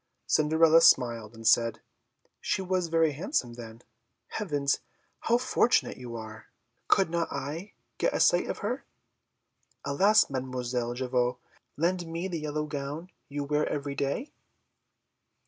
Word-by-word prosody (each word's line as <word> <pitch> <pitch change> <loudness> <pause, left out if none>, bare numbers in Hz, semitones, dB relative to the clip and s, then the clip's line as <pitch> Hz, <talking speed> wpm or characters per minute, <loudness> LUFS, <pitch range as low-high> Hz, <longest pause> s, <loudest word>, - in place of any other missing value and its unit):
Cinderella 160 +1 +4
smiled 115 -7 +3
and 115 0 -11
said, 115 0 +4 0.6
"She 190 - -1
was 185 -1 0
very 165 -1 +3
handsome, 145 - -2
then? 115 -1 -10 0.5
Heavens! 145 -9 -1 0.4
how 235 - +2
fortunate 245 -1 +2
you 120 -2 -8
are! 110 -1 -9 0.4
Could 190 -4 +3
not 170 -1 -1
I 160 +9 -5 0.3
get - - +2
a - - 0
sight - - +4
of - - -2
her? - - -2 1.0
Alas! 200 +10 +4
Mademoiselle 125 -2 -3
Javotte, 125 -1 0 0.4
lend 175 +2 0
me 165 +3 -3
the 170 -3 -3
yellow 150 0 -2
gown 150 +4 -5 0.2
you 145 0 -3
wear 150 +1 0
every 145 -1 -3
day?" 140 - -2
145 Hz, 130 wpm, -28 LUFS, 125-170 Hz, 1.0 s, Cinderella